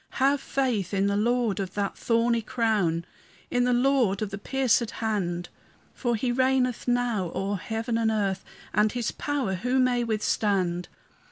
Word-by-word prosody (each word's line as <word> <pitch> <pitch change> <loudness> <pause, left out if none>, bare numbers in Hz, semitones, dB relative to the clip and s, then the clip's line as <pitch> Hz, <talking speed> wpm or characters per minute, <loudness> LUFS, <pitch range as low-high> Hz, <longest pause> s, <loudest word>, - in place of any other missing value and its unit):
Have 275 +1 +3
faith 225 -9 -1
in 195 0 +2
the 200 0 +1
Lord 230 -1 +1
of 190 -2 -4
that 200 -1 -1
thorny 230 0 +1
crown, 210 -8 0 0.5
In 245 0 +2
the 250 - +2
Lord 245 -5 +2
of 210 - -4
the 200 - -5
piercèd 250 -1 +1
hand; 180 -6 -2 0.4
For 240 -3 -1
he 245 +3 0
reigneth 255 -1 +1
now 240 -7 0
o'er 195 0 -1
earth 225 +1 -2
and 230 -1 +1
heaven, 215 -4 +1 0.4
And 210 +1 +3
his 245 -2 -1
power 280 -9 -2
who 250 +8 0
may 250 -2 +3
withstand? 200 -5 0
225 Hz, 160 wpm, -26 LUFS, 200-245 Hz, 0.5 s, Have